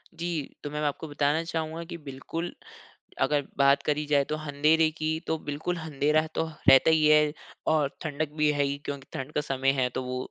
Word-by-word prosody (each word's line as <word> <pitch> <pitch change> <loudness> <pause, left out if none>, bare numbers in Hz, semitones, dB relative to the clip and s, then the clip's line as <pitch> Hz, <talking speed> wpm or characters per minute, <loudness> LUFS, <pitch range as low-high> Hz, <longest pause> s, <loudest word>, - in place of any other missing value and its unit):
जी, 170 -3 -3
तो 145 - -4
मैं 150 - -9
मैं 150 - -2
अब - - -1
आपको 145 +2 -3
बताना 145 +2 +1
चाहूँगा 165 0 -3
कि 170 +1 -7
बिल्कुल, 160 +6 -5 0.7
अगर 145 +1 +3 0.2
बात 140 0 +4
करी 150 +1 0
जाए 145 -1 +3
तो - - +1
अँधेरे 155 +2 +2
की 155 0 -1 0.2
तो 160 - 0
बिल्कुल 160 +5 -2
अँधेरा 155 0 +1
तो - - +1 0.2
रहता 135 +3 +7
ही 155 -1 +4
है 150 -1 +5 0.4
और 150 -3 +2
ठंडक 155 -1 -3
भी 150 0 +5
है 145 -1 +1
ही 140 0 -1
क्योंकि 140 -1 -5
ठंड 135 +3 -5
का - - +1
समय 135 -1 +1
है 125 - +2
तो - - -4
वो 125 0 -4
150 Hz, 210 wpm, -27 LUFS, 140-160 Hz, 0.7 s, रहता